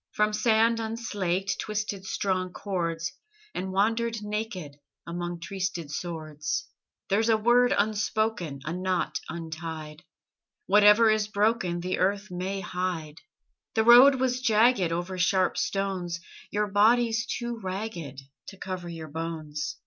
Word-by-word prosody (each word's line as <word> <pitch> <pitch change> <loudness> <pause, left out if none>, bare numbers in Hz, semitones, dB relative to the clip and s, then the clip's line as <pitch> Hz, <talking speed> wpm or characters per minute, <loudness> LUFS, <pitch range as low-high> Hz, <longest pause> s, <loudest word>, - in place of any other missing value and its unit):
From 210 0 +2
sand 225 +1 +3
unslaked 200 -5 -2
Twisted 210 -2 -3
strong 185 -2 -1
cords, 170 -4 -3 0.4
And 190 +1 -3
wandered 225 +3 0
naked 210 -8 -4 0.3
Among 175 0 -4
trysted 180 -3 -4
swords. 155 -1 -4 0.4
There's 220 +3 +2
a 220 - +5
word 240 +3 +4
unspoken, 215 -7 0
A 165 - -3
knot 185 0 -1
untied. 160 -1 -6 0.6
Whatever 210 +2 +6
is 215 -1 +1
broken 205 -4 +1
The 185 +1 -2
earth 200 +1 0
may 190 +2 -3
hide. 180 -5 -4 0.5
The 220 - +3
road 245 +4 +9
was 255 -1 0
jagged 225 -5 +3
Over 175 +2 -3
sharp 185 +1 +2
stones: 185 -3 -2 0.3
Your 210 +1 0
body's 225 +3 +3
too 235 -1 -3
ragged 185 -8 -5 0.3
To 195 - -10
cover 185 -2 -5
your 165 -2 -7
bones. 155 -1 -4
195 Hz, 125 wpm, -27 LUFS, 170-220 Hz, 0.6 s, road